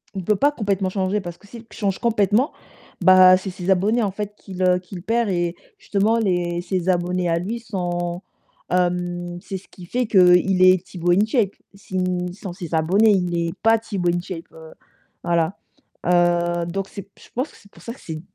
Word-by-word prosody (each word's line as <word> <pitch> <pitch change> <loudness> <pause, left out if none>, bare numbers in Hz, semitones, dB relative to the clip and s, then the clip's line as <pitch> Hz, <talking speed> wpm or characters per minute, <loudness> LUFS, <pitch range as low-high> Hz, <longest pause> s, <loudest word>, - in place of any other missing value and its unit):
On 190 - -3
peut 210 +4 +1
pas 285 +8 +3
complètement 200 -7 -1
changer 195 +1 -1
parce 175 -1 -8
que 205 - -20
s'il 230 +2 -11
change 195 -3 -2
complètement, 225 - +2 0.5
bah, 185 0 +8
c'est 190 - -6
ses 180 0 -6
abonnés, 215 +5 +2
en 200 - 0
fait, 210 +1 -5
qu'il, 190 -3 -9
heu 180 0 +4
qu'il 180 -1 -10
perd 225 +2 0
et 175 -1 -1 0.2
justement 210 +3 +1
les 175 -4 0
ses 180 0 -3
abonnés 180 0 0
à 165 - +1
lui 220 +7 -4
sont, 175 -5 -3 0.5
hem, 175 -1 -1
c'est 190 - -5
ce 190 - -15
qui 180 - -13
fait 245 +7 -1
qu'il 185 -2 +5
est 185 -1 +6
Tibo 175 -1 -1
InShape. 210 +2 +2 0.2
Si 195 -1 -7 0.4
sans 190 -1 -8
ses 175 -3 -5
abonnés, 190 +8 +3
il 180 -3 +1
est 170 -1 -2
pas 225 0 +5
Tibo 195 -6 -2
InShape, 175 -1 -4
heu 160 0 -13 0.5
voilà, 170 +2 0 0.5
heu, 175 -1 +2
donc 195 +2 -3
c'est 200 0 -9
je - - -17
pense 255 +5 -2
que - - -18
c'est 200 - -21
pour - - -18
ça 230 - -6
que - - -17
c'est 160 -1 -6
185 Hz, 195 wpm, -22 LUFS, 175-205 Hz, 0.5 s, bah